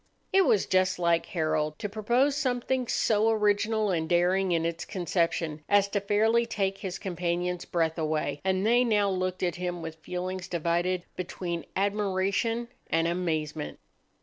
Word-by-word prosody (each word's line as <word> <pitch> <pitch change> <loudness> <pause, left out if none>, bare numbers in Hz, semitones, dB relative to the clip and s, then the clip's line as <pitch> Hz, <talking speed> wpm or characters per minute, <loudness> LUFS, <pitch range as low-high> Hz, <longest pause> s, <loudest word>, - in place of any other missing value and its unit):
It 385 -1 +5
was 205 - +3
just 185 0 +2
like 170 -1 +1
Harold 155 -2 -1
to - - -3
propose 240 +7 +1
something 255 -2 0
so 220 0 +2
original 210 0 +2
and 160 -2 -1
daring 180 +2 +2
in 165 -1 +1
its 170 0 -2
conception 165 -4 -1
as 200 -1 +4
to 205 0 -1
fairly 220 +4 +2
take 195 -3 -1
his 190 -1 -4
companions' 180 -1 -2
breath 165 -1 0
away, 155 -2 -1
and 190 +1 +1
they 240 +3 +4
now 210 -4 +2
looked 185 0 -2
at 175 -2 0
him 175 -1 -3
with 160 0 -6
feelings 180 +2 -4
divided 175 +2 0
between 175 -2 -4
admiration 200 +4 0 0.2
and 165 0 +2
amazement. 155 - -2
185 Hz, 150 wpm, -28 LUFS, 170-210 Hz, 0.2 s, It